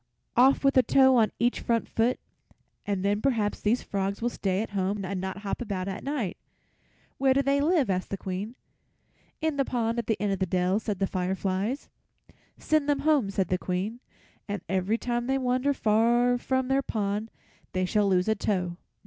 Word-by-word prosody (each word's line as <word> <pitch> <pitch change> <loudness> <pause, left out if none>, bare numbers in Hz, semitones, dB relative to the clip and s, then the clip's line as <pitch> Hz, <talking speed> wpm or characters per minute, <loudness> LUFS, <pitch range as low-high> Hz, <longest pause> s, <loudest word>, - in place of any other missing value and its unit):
"Off 265 +4 +5
with 275 0 +3
a - - +9
toe 265 0 +5
on 225 -3 +4
each 240 +1 +1
front 230 -1 0
foot, 230 +3 +1 0.7
and 200 -2 -1
then 205 +1 +1
perhaps 220 -6 0
these 225 +4 +1
frogs 195 0 -2
will 240 - 0
stay 195 -1 -1
at - - -8
home 195 0 -1
and 185 0 -3
not 190 0 -4
hop 200 - -3
about 195 -5 -3
at 195 +1 -5
night. 270 -10 -2 0.8
Where 265 -1 +3
do 275 - +3
they 280 +1 +2
live?" 310 -3 +3
asked 185 -1 -1
the 195 - -3
Queen. 195 +5 -5 0.9
"In 315 -2 0
the 275 - +3
pond 235 -2 -1
at 235 - -4
the 220 - 0
end 200 0 0
of 195 - -3
the 190 - 0
dell," 180 +3 +1
said 210 -3 -3
the 195 - +1
fireflies. 190 +6 -2 0.7
"Send 305 -2 +1
them 285 -1 +2
home," 295 -9 +3
said 190 -3 -1
the 180 - +1
Queen, 195 +7 -3 0.5
"and 205 -3 -4
every 190 +4 0
time 240 0 -2
they 270 0 +1
wander 255 +2 +1
far 240 0 +3
from 260 0 0
their 270 +1 +2
pond 210 -2 -2 0.4
they 185 0 +1
shall 205 +2 +2
lose 185 0 +2
a 220 - +4
toe." 180 -4 -2
215 Hz, 195 wpm, -27 LUFS, 195-255 Hz, 0.9 s, a